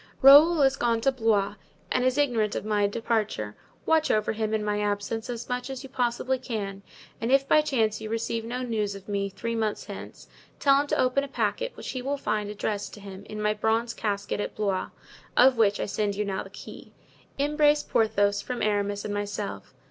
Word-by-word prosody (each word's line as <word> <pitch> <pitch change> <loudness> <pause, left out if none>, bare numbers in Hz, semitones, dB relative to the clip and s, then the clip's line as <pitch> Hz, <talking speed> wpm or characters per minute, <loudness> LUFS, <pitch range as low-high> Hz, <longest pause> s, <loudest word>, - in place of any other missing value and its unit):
"Raoul 295 +3 +8
is 270 0 +3
gone 235 -1 +1
to 270 - +3
Blois 220 -5 +1 0.4
and 250 - +2
is 255 +1 +2
ignorant 235 -7 +1
of - - -3
my 210 -1 +2
departure; 215 - -2 0.3
watch 320 -1 +3
over 215 0 +2
him 220 0 -2
in 215 -1 0
my 210 0 0
absence 205 +3 -2
as 240 -1 -5
much 250 +1 -3
as 265 0 -6
you 270 - -9
possibly 255 +1 -1
can; 200 -6 -4 0.4
and 230 +2 -1
if 275 0 +4
by 305 - +5
chance 220 -7 0
you 215 - -5
receive 230 0 -2
no 245 +3 -4
news 215 -4 -1
of 195 -1 -11
me 200 -1 -1
three 230 +4 -4
months 220 -2 -2
hence, - - -9 0.3
tell 275 0 +5
him 290 - -5
to - - 0
open 255 +2 +2
a - - -4
packet - - -1
which - - -7
he 255 - -4
will 280 +3 -2
find 210 -6 -2
addressed 210 0 -3
to - - -12
him 200 0 -10
in 215 - -7
my 210 0 +1
bronze 225 +2 0
casket 205 -2 -2
at - - -4
Blois, 200 -3 -1 0.5
of 255 0 +6
which 205 -2 +3
I - - -1
send 205 0 -1
you 210 +1 -1
now 195 -1 -2
the - - -10
key. - - -11 0.4
"Embrace 295 +1 +3
Porthos 205 -4 +2
from 250 -1 -4
Aramis 205 -1 0
and 205 - -3
myself. 205 0 -4
225 Hz, 210 wpm, -27 LUFS, 205-255 Hz, 0.5 s, Raoul